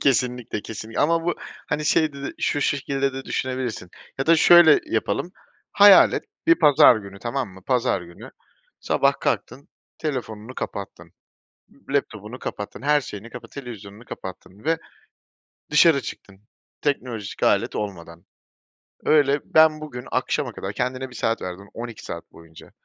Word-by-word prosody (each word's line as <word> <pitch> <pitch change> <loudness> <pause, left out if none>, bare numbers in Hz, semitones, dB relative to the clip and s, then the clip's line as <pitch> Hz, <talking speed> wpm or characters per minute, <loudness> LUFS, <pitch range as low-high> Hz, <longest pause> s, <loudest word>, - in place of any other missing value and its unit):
Kesinlikle, 125 -5 0
kesin 110 +1 -8
Ama 165 +2 +2
bu, 175 - 0 0.3
hani, 150 +1 -2
şey 155 0 +2
de 140 0 -10
de, - - -4
şu 145 - 0
şekilde 140 -1 0
de 135 0 -6
düşünebilirsin 125 -8 -3 0.3
ya 135 - -1
da 165 0 +6
şöyle 175 - +7
yapalım: 185 - -2 0.4
Hayal 205 -1 +8
et. - - -2 0.2
Bir 340 - +7
pazar 145 - +6
günü, 100 -2 -9
tamam 120 0 -3
mı, 95 0 -15
pazar 125 -6 +1
günü, 85 0 -12 0.5
sabah - - +2
kalktın, 140 +3 -2 0.3
telefonunu 125 -5 -5
kapattın, 100 -1 -7 0.6
ı 135 - -13
laptopunu 115 -4 -2
kapattın, 105 +5 -6
her 150 +1 +3
şeyini 115 -3 -9
kapa 125 - -10
televizyonunu 115 -5 -10
kapattın 95 +3 -10
ve 165 0 +1 0.9
dışarı 150 -1 +5
çıktın 100 0 -9 0.4
teknolojik 125 -7 -3
alet - - +2
olmadan. 85 -5 -6 0.8
Öyle, 145 -2 +4
ben 155 -1 +4
bugün 125 -5 -7
akşama 130 -1 -1
kadar 95 +1 -6
kendine 130 +3 -3
bir 125 - -14
saat 115 +1 -1
verdin 95 +2 -7
12 115 -1 -8
saat 85 - -8
boyunca, 80 -1 -15
125 Hz, 145 wpm, -23 LUFS, 105-145 Hz, 0.9 s, Hayal